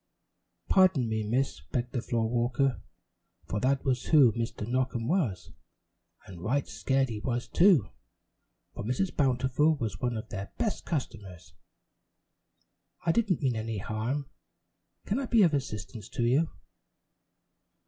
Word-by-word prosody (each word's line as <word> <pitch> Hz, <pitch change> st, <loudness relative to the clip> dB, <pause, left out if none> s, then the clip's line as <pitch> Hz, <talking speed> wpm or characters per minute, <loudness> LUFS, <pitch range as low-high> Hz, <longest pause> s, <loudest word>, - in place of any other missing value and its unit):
"Pardon 185 Hz, -10 st, +4 dB
me, 110 Hz, 0 st, -1 dB
Miss," 120 Hz, +6 st, -1 dB
begged 125 Hz, -1 st, -1 dB
the 125 Hz, -, -2 dB
floor 115 Hz, -2 st, 0 dB
walker 120 Hz, 0 st, 0 dB, 0.6 s
for 105 Hz, -, -2 dB
that 135 Hz, +3 st, +1 dB
was 130 Hz, -2 st, 0 dB
who 140 Hz, -7 st, +6 dB
Mr. 115 Hz, -2 st, -4 dB
Knockem 125 Hz, -2 st, -1 dB
was, 155 Hz, -, -1 dB, 0.7 s
and 90 Hz, -3 st, -11 dB
right 130 Hz, +9 st, 0 dB
scared 135 Hz, -1 st, 0 dB
he 110 Hz, -2 st, -4 dB
was, 120 Hz, +2 st, -2 dB
too, 175 Hz, -, +4 dB, 0.8 s
for -, -, -6 dB
Mrs. 125 Hz, -, -1 dB
Bountiful 130 Hz, +3 st, +2 dB
was 115 Hz, -7 st, -4 dB
one 120 Hz, -2 st, -1 dB
of 110 Hz, -, -7 dB
their 100 Hz, 0 st, -6 dB
best 215 Hz, -, -2 dB
customers. 95 Hz, -, -5 dB, 1.5 s
"I 165 Hz, -, +4 dB
didn't 190 Hz, -5 st, +1 dB
mean 130 Hz, -3 st, +1 dB
any 110 Hz, 0 st, -3 dB
harm. 115 Hz, +7 st, -3 dB, 0.8 s
Can 215 Hz, -, 0 dB
I 270 Hz, -, -3 dB
be 230 Hz, -3 st, +5 dB
of 165 Hz, -4 st, +4 dB
assistance 110 Hz, -5 st, -4 dB
to 125 Hz, -1 st, -2 dB
you?" 140 Hz, +7 st, +3 dB
125 Hz, 140 wpm, -29 LUFS, 110-140 Hz, 1.5 s, who